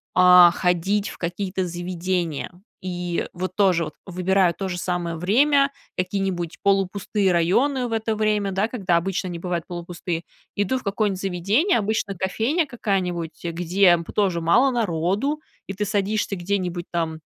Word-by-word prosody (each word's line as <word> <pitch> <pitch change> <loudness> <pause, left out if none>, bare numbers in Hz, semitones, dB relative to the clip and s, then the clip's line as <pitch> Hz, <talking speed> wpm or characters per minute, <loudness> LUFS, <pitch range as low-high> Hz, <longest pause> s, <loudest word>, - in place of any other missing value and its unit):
а, 180 -1 +8
ходить 190 +4 0
в - - -10
какие-то 185 +2 -3
заведения. 175 -2 -3 0.3
И 180 -1 -3
вот 185 +1 -4
тоже 185 -5 +3
вот - - -8
выбираю 185 0 +2
то 195 - -4
же 175 - -3
самое 175 -1 -2
время, 275 - +3 0.3
какие-нибудь 185 -2 -2
полупустые 195 0 +1
районы 245 - +2
в - - -8
это 225 0 -1
время, 210 -2 +1
да, 195 +3 +1
когда 195 -8 0
обычно 185 +2 -2
они 175 -1 -5
бывают 175 -1 -3
полупустые. 175 -1 -5 0.3
Иду 205 +6 0
в - - -16
какое-нибудь 200 -2 -1
заведение, 200 - +1
обычно 215 -1 -1
кофейня 225 - 0
какая-нибудь, 185 - -3
э, 170 - -1
где 175 +2 +3
п 170 - -7
тоже 190 -5 +1
мало 240 +12 +4
народу. 210 - 0 0.3
И 195 - -4
ты 205 +2 -2
садишься 205 0 -1
где-нибудь 180 -1 -2
там 165 -2 -2
185 Hz, 150 wpm, -23 LUFS, 175-205 Hz, 0.3 s, а